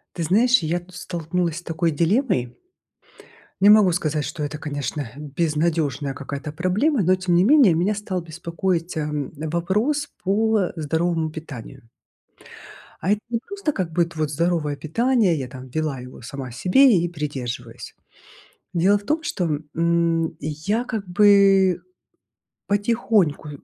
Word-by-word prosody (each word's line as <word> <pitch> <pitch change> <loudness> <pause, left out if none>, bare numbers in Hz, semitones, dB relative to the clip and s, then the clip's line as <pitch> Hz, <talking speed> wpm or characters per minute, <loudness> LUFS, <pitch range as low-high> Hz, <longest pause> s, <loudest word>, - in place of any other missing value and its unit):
Ты 170 - -3
знаешь, 230 +9 +4
я 165 +1 -1
тут 175 +1 -15
столкнулась 170 -1 -3
с 175 - -6
такой 165 -1 -1
дилеммой. 165 - 0 1.0
Не 200 - +6
могу 210 -4 +6
сказать, 155 -3 -1
что 150 - -5
это, 145 +1 -4
конечно, 145 -2 -4
безнадежная 150 -1 -1
какая-то 140 +2 -6
проблема, 195 - +1
но 185 +1 +4
тем 185 -2 0
не 175 - +4
менее 255 - +6
меня 180 +6 +1
стал 200 -3 -3
беспокоить, 170 +1 -3
эм, 150 -2 -2
вопрос 190 - -1 0.2
по 210 0 +2
здоровому 160 0 -1
питанию. 140 -7 -10 1.1
А 185 - -1
это 210 - 0
не 235 - 0
просто 395 -5 -2
как 180 - -3
будет 170 0 0
вот 155 -1 -1
здоровое 155 -2 0
питание, 205 - +1
я 130 -3 -4
там 130 0 -10
вела 155 -1 -2
его 125 0 -11
сама 130 +1 -7
себе 195 - +4
и 170 +1 0
придерживаюсь. 130 -7 -6 0.8
Дело 185 +4 +3
в 205 - -10
том, 310 +8 -1
что, 170 - -1 0.2
м, 165 -1 +1
я 160 - -2
как 220 -6 -4
бы 195 -1 +5 0.9
потихоньку 205 -7 +1
170 Hz, 140 wpm, -22 LUFS, 150-200 Hz, 1.1 s, Не